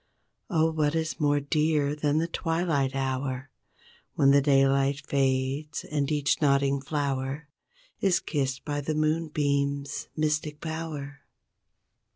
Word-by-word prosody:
Oh 160 -1 +2
what 155 -1 0
is 160 -1 -2
more 145 -1 +3
dear 150 0 +1
than 150 0 0
the 165 +1 +1
twilight 165 -6 0
hour 130 0 -2 0.6
When 140 -1 +5
the 140 0 +6
daylight 135 0 +3
fades 135 +2 0
and 145 -1 -2
each 150 0 +1
nodding 140 -1 +2
flower 140 0 -2 0.5
Is 190 -3 +3
kissed 135 -6 -2
by 145 -1 -2
the 155 +2 -2
moonbeams' 145 -3 0
mystic 150 -1 -1
power? 155 -3 -5
145 Hz, 120 wpm, -27 LUFS, 140-155 Hz, 0.6 s, the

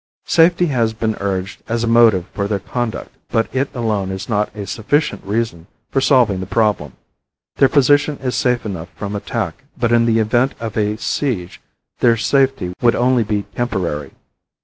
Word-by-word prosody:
Safety 170 +2 +4
has 120 -8 0
been 110 -1 -1
urged 95 -1 -3
as 115 0 0
a - - 0
motive 115 -6 +5
for 100 -1 -2
their 100 -1 0
conduct 120 +4 -4 0.2
but 115 - +1
it 135 +1 +1
alone 110 -5 -1
is 95 +1 -5
not 105 -2 0
a 105 -1 -5
sufficient 110 - -1
reason 100 -5 -2 0.2
for 135 - +1
solving 125 -9 +3
the 95 - -5
problem. 105 - 0 0.6
Their 135 - +5
position 145 +2 +3
is 130 -2 -3
safe 125 -2 +1
enough 90 -5 -5
from 100 0 -5
attack 105 -1 -4
but 120 -1 0
in 115 0 +4
the 115 -1 +3
event 120 +4 +1
of 115 -3 -5
a 105 0 0
siege 110 -8 -2 0.4
their 115 -1 +4
safety 135 -7 +1
would 120 -1 +4
only 125 0 +3
be 105 -1 -1
temporary. 90 - -2
115 Hz, 170 wpm, -18 LUFS, 100-125 Hz, 0.6 s, motive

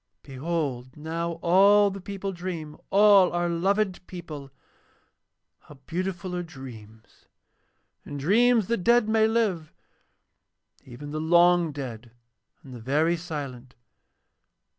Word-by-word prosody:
'Behold 135 -3 -4
now 165 +2 -3
all 200 +3 +5
the 195 0 -8
people 195 +1 -5
dream, 170 -4 -6
all 200 -2 +6
our 175 0 0
loved 185 +2 -1
people. 155 -6 -9 1.1
How 150 - -16
beautiful 180 +1 -4
are 175 - -2
dreams! 120 -9 -13 0.8
In 145 - -7
dreams 220 - +3
the 235 +4 -1
dead 235 +4 +3
may 220 0 +3
live, 205 -9 -1 1.1
even 130 +4 -10
the 155 +1 -3
long 175 0 +4
dead 125 -5 -7 0.5
and 130 - -12
the 120 - -9
very 150 +8 +1
silent. 140 -7 -7
170 Hz, 115 wpm, -26 LUFS, 145-195 Hz, 1.1 s, all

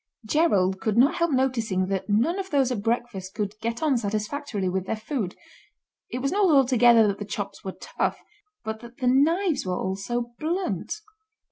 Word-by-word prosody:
Gerald 200 - +2
could 220 0 0
not 275 +7 +5
help 340 0 +2
noticing 240 -9 +1
that 195 +1 -2
none 245 - +2
of 385 -1 -4
those 270 -3 +2
at 225 -5 -2
breakfast 225 -4 -2
could 210 -2 -2
get 230 +4 -3
on 290 -5 +3
satisfactorily 215 +1 -2
with 190 +1 -2
their - - 0
food. 215 -3 -3 0.7
It 250 +1 -4
was 275 - +1
not 395 -1 +3
altogether 245 -5 +6
that 200 0 -1
the - - -3
chops 200 -1 -5
were 190 - -5
tough, - - -2 0.4
but 220 0 -4
that 235 +1 -13
the 260 - -3
knives 310 +7 +3
were 185 -1 -2
all 190 0 -2
so 240 +4 -3
blunt. 330 - -2
235 Hz, 180 wpm, -25 LUFS, 200-280 Hz, 0.7 s, altogether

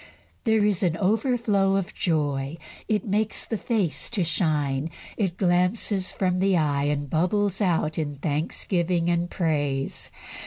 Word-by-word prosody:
There 220 -2 +3
is 205 -4 +1
an 170 -3 +1
overflow 210 -1 +2
of 195 +1 -2
joy. 145 -3 -1 0.3
It 215 +2 0
makes 215 +1 0
the 225 - -2
face 205 - -1
to 215 -6 0
shine; 155 -4 0 0.3
it 190 -5 -1
glances 185 +2 +1
from 185 -1 0
the 190 -1 +3
eye, 145 -3 +1
and 145 0 -1
bubbles 190 +6 +1
out 165 -4 +1
in 145 -2 -2
thanksgiving 170 +4 0
and 170 0 0
praise. 145 -6 -1
175 Hz, 140 wpm, -25 LUFS, 155-200 Hz, 0.3 s, There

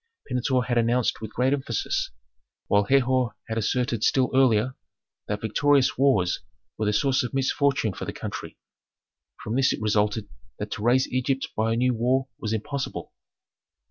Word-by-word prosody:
Pentuer 125 0 0
had 120 -1 +1
announced 120 +1 +1
with 110 -1 -6
great 130 +3 +2
emphasis, 130 -5 -1 0.6
while 100 0 +3
Herhor 130 -1 +2
had 115 0 -2
asserted 120 0 0
still 130 -2 +2
earlier, 130 -1 +3 0.5
that 105 0 -3
victorious 140 +5 +2
wars 105 -10 +2 0.4
were 110 - -2
the - - +3
source 130 +5 +2
of 125 +2 -4
misfortune 135 -4 +1
for - - -6
the - - -4
country. - - -7 0.9
From 110 - -3
this 135 0 +3
it - - -3
resulted 105 0 0 0.3
that - - -5
to - - -4
raise 125 +4 +3
Egypt 130 +1 -1
by 110 +1 +1
a - - -1
new 125 +1 +2
war 130 +3 +1
was 110 -6 -3
impossible. 140 +5 -4
125 Hz, 160 wpm, -25 LUFS, 110-130 Hz, 0.9 s, while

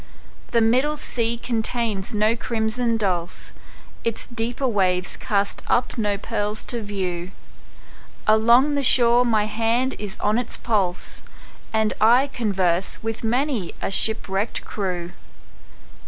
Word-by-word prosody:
The 235 - +2
middle 260 +7 +2
sea 235 -4 -1
contains 230 -3 -2
no 215 +1 +2
crimson 230 0 -1
dulse, 185 -4 -2 0.5
Its 230 -1 -2
deeper 240 +3 -2
waves 185 -5 +1
cast 200 -1 -1
up 245 - +1
no 210 -4 0
pearls 210 0 -3
to 235 - -2
view; 185 -4 -4 1.0
Along 235 +6 +4
the 285 - 0
shore 240 -2 +6
my 220 -3 +2
hand 230 +4 0
is 210 -1 -6
on 210 +3 +1
its 245 - -2
pulse, 195 -6 -2 0.5
And 220 -1 +1
I 245 +6 +5
converse 190 -6 0
with 225 0 -4
many 245 - -1
a - - -3
shipwrecked 205 0 +1
crew. 180 -4 -4
220 Hz, 125 wpm, -23 LUFS, 200-235 Hz, 1.0 s, shore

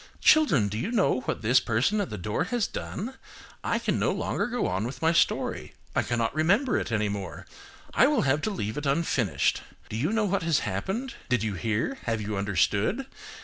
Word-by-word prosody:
Children, 225 - +5
do 105 +2 -3
you 195 - -2
know 205 - +2
what - - -3
this 120 +4 +5
person 125 - +1
at 200 - -3
the 105 - -5
door 105 - -1
has 235 +3 0
done? 250 +8 -5 0.5
I - - +1
can - - -1
no - - +2
longer - - -1
go 245 0 -1
on 95 +3 -1
with 130 - -7
my 165 +1 +4
story, 170 - 0 0.2
I - - +4
cannot 115 -1 -1
remember 200 - +2
it - - -4
any 105 -2 +1
more. 100 -3 -5 0.5
I 260 - +5
will 295 -3 +2
have 145 +2 +2
to 215 - -1
leave 110 - -3
it 145 - -3
unfinished. 135 - +1 0.3
Do - - -5
you 140 - 0
know 220 -1 +2
what 195 0 0
has 165 -3 +2
happened? 190 - -3 0.2
Did 125 -4 +2
you 110 -2 -1
hear? 115 - -1
Have 115 -1 0
you 105 0 -3
understood? 100 - +1
135 Hz, 205 wpm, -27 LUFS, -, 0.5 s, Children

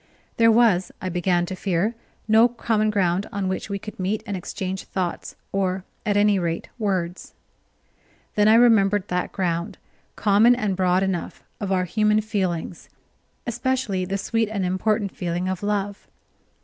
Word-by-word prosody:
There 230 0 +6
was, 220 -6 +3
I 185 - -3
began 175 0 +1
to 185 - -5
fear, 190 +3 0 0.3
no 220 +2 +6
common 225 -2 0
ground 195 -2 +1
on 200 -3 -2
which 190 +2 -3
we 200 - -2
could 210 +1 -10
meet 195 +3 -1
and 200 - -3
exchange 190 +1 -5
thoughts, 180 -3 -4 0.2
or, 190 -1 -1 0.2
at 205 -1 +2
any 205 -1 +4
rate, 170 -1 -3
words. 185 -5 -2 1.0
Then 210 0 +3
I 220 - +7
remembered 205 -4 +4
that 180 0 -1
ground, 170 -3 -2 0.4
common 215 +4 +5
and 210 -6 -1
broad 185 0 +2
enough, 190 -3 -3 0.2
of 200 -2 -3
our 185 -1 +2
human 210 +3 +2
feelings, 185 -6 -3 0.6
especially 240 -5 -1
the 195 +2 -2
sweet 225 +2 0
and 200 -4 -2
important 200 +2 0
feeling 175 +1 -2
of 185 -1 -3
love. 205 -1 -2
195 Hz, 155 wpm, -23 LUFS, 185-215 Hz, 1.0 s, I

